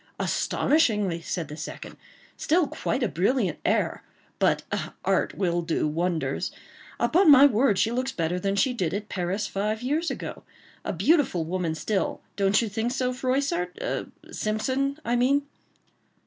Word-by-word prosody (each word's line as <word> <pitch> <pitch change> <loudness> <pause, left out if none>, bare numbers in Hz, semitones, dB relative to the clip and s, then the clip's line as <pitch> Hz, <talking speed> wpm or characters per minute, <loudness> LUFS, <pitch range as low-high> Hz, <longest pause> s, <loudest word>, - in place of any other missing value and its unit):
"Astonishingly," 210 - +1
said 165 0 -3
the 150 - -8
second; 155 - -7 0.4
"still 340 +2 +2
quite 265 -1 -2
a - - +2
brilliant 195 - 0
air, - - +1 0.4
but - - +2 0.4
art - - +1
will 175 -3 0
do 165 -2 0
wonders. 165 +2 -1 0.5
Upon 360 +1 +4
my 280 -1 +9
word, 240 -5 +3
she 225 - +2
looks 255 +2 -1
better 170 -3 -1
than 195 +2 -1
she 250 +6 +2
did 185 -7 -1
at 210 +1 -5
Paris 185 +3 -2
five 215 +4 -2
years 310 +6 0
ago. - - -6 0.4
A - - -2
beautiful 200 - +2
woman 170 -1 -2
still;—don't 200 +2 0
you - - -1
think 220 +4 -2
so, 255 -1 -1
Froissart?—Simpson, 255 - -2
I 240 - +1
mean." 270 +4 +3
215 Hz, 140 wpm, -26 LUFS, 180-260 Hz, 0.5 s, my